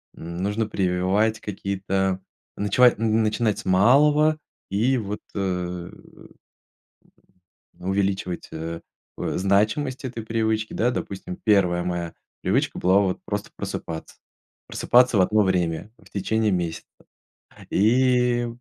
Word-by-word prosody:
м, 85 +1 -7
нужно 105 +4 -1
прививать 95 +3 +1
какие-то 95 -1 -2 0.4
ночевать 110 +4 +4
н 110 0 +2
начинать 110 0 0
с - - -9
малого, 145 +11 +4 0.3
и 115 +7 +2
вот, 105 -2 -4
э, - - -2
м, 90 -2 -5 1.5
увеличивать, 95 -1 -1
э, 80 +1 -5 0.4
о - - -2
значимость 110 +9 +1
этой 115 -2 -6
привычки. 110 -1 -1
Да, 120 +3 +2
допустим, 95 -6 -5
1 90 -5 +3
моя 85 -2 -3 0.3
привычка - - 0
была- 95 +2 +4
вот 95 -2 0
просто - - -4
просыпаться. 80 -1 -6 0.5
Просыпаться 125 -3 +3
в - - +5
одно 105 +3 +3
время 90 +1 -1
в - - -19
течение 105 +1 0
месяца. 85 -2 -2 0.8
И 125 +2 +3
100 Hz, 115 wpm, -24 LUFS, 90-115 Hz, 1.5 s, в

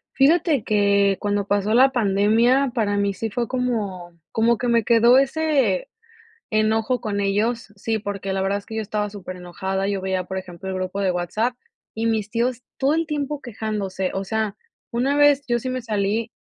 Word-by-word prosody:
Fíjate 300 - +3
que 200 -2 +3
cuando 205 -1 -1
pasó 205 +1 +1
la 260 +2 +7
pandemia 230 +4 +3
para 210 -4 0
mí 200 0 +1
sí 225 +4 -4
fue 235 +3 -2
como, 205 -9 -3
como 230 +1 +2
que 245 - -2
me 235 -1 +3
quedó 235 +2 +5
ese 275 -8 +1 0.6
enojo 220 +3 +1
con 210 -3 -2
ellos. 210 +3 -1
Sí, 220 +2 -2
porque 200 -1 -4
la 190 - -1
verdad 195 +1 0
es 200 - -17
que 220 - -8
yo - - 0
estaba 210 0 -2
superenojada, 190 0 -4
yo 200 -1 -1
veía, 190 -1 -1
por 190 +1 -5
ejemplo, 185 0 -7
el 190 - -3
grupo 185 +1 -3
de 190 -2 +2
WhatsApp, 215 +8 -1 0.4
y 225 +1 -3
mis 220 -2 0
tíos 240 +2 -1 0.2
todo 275 +2 +2
el 330 +1 +1
tiempo 295 -2 -3
quejándose. 210 -6 -3
O 195 - -2
sea, 220 0 -2 0.4
una 265 +5 +1
vez 290 -1 +5
yo 240 -1 +1
sí 255 - -4
me 255 0 -3
salí 215 0 -1
215 Hz, 185 wpm, -22 LUFS, 195-245 Hz, 0.6 s, la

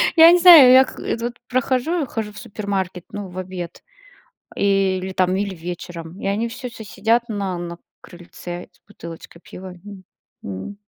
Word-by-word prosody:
Я 330 0 +9
не 355 - +5
знаю, 335 -8 +10
я 260 +1 +8
к - - -11
так 230 - -4
вот 240 +1 -3 0.2
прохожу, 260 +6 0
хожу 220 -3 -5
в 210 - -15
супермаркет, 195 -4 -4
ну, 205 -1 -6
в 180 0 -12
обед 180 -2 -7 0.7
или, 190 -1 +1
там, 185 0 +1
или 200 -1 -2
вечером, 175 0 -8
и - - -6
они 210 +4 0
всё 245 +2 -7
с 235 - -15
сидят 225 +4 0
на 200 -4 -3
на 170 0 -7 0.2
крыльце 175 0 -10
с - - -31
бутылочкой 170 -3 -11
пива, 185 0 -10
м, 200 -2 -11 0.4
м. 100 - -7
195 Hz, 170 wpm, -21 LUFS, 180-235 Hz, 0.7 s, знаю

